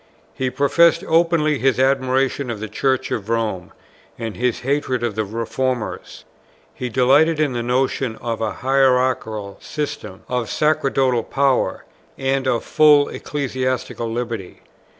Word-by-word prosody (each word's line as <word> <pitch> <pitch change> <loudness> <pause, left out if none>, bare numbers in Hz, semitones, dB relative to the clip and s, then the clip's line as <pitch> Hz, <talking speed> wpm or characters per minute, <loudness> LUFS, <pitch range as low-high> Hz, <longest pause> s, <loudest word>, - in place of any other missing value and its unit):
He 130 -1 -2
professed 150 +6 +3
openly 160 -3 +2
his 130 +1 +2
admiration 135 0 +1
of 115 -3 -4
the 110 - -5
Church 130 +5 -1
of 110 -1 -3
Rome, 110 -6 -2 0.5
and 115 -3 -5
his 125 -1 -1
hatred 130 -2 -1
of 120 -3 -1
the 110 +1 -1
Reformers. 115 +3 -4 0.5
He 125 - -5
delighted 140 +6 +3
in 150 -4 +1
the 120 - -2
notion 125 0 0
of 115 0 -4
an 110 - 0
hierarchical 125 -6 +1
system, 145 -10 -5
of 125 -3 -2
sacerdotal 135 -5 +1
power, 135 +2 0 0.3
and 135 0 0
of 120 -3 +1
full 150 -2 +5
ecclesiastical 130 -4 -3
liberty. 115 -5 -5
130 Hz, 130 wpm, -20 LUFS, 115-135 Hz, 0.5 s, full